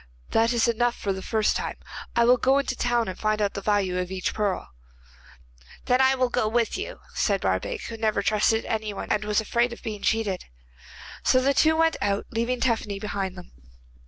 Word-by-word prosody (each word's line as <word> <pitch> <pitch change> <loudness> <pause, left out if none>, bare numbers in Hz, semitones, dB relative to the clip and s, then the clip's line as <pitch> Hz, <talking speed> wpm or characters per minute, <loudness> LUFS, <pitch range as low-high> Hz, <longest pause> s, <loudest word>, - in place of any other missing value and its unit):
'That 230 +1 +3
is 235 -1 +2
enough 235 +1 +1
for 195 - -2
the 190 - -6
first 215 +1 +1
time. - - -3 0.4
I 235 - +4
will 250 +1 +6
go 265 +3 +3
into 280 -1 0
the - - -9
town 240 -1 +1
and 185 - -4
find 215 0 0
out 205 -1 0
the 200 - -5
value 195 -3 +1
of 180 -1 -3
each 190 -1 -2
pearl.' 205 -3 -2 1.2
'Then 250 +1 +3
I 265 0 +5
will 255 -1 +1
go 220 - 0
with 230 +1 +1
you,' - - -6
said - - +1
Barbaik, 485 -4 -1
who 230 - -6
never 220 -2 0
trusted 215 +2 +2
anyone 215 -2 -3
and 210 - +1
was 210 0 +1
afraid 235 +3 +1
of - - -12
being 215 -4 -5
cheated. 210 -5 0 0.8
So 255 - +4
the 275 +2 +2
two 315 +3 +4
went 325 0 +3
out, 200 0 0
leaving 240 +2 -1
Tephany 225 -5 0
behind 195 -3 -3
them. 180 - -11
225 Hz, 205 wpm, -25 LUFS, 205-240 Hz, 1.2 s, will